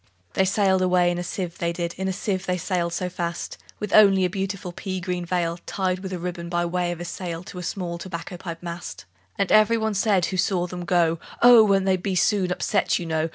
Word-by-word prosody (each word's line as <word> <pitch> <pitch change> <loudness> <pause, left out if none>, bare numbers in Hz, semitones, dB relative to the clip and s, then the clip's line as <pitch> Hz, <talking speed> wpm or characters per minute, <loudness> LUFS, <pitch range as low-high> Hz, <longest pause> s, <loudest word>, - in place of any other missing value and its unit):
II. 105 - -37 0.3
They 190 - +3
sailed 190 -1 +2
away 180 -1 +3
in 175 - -2
a - - -3
sieve, 175 -1 -5
they 170 0 0
did, 170 0 -3
In 190 +1 -3
a - - 0
sieve 190 0 -3
they 180 0 +1
sailed 175 -1 -1
so 180 +2 -2
fast, 170 -1 -4 0.2
With 210 -2 -4
only 195 -3 +6
a 180 - -1
beautiful 195 -1 -3
pea 185 +1 -4
green 180 -1 -3
veil 170 -1 -1
Tied 185 -2 -1
with 190 0 -6
a 185 - -3
ribbon, 170 0 -5
by 175 0 0
way 175 0 -1
of 175 - -6
a 175 - -5
sail, 170 -1 -5
To 180 - -9
a - - -5
small 175 -1 -4
tobacco 180 0 -6
pipe 170 -1 -7
mast. 170 0 -7 0.3
And 200 - 0
every 215 +2 +5
one 220 -1 -1
said 195 -3 +2
who 185 - -3
saw 180 -1 +1
them 180 0 -6
go, 170 -2 +2 0.2
"Oh! 240 -2 +9
won't 195 -2 +3
they 190 -1 +3
be 185 +1 -2
soon 185 -1 +2
upset, 195 +2 +1
you 175 - -5
know? 160 0 -1
180 Hz, 245 wpm, -24 LUFS, 175-190 Hz, 0.3 s, Oh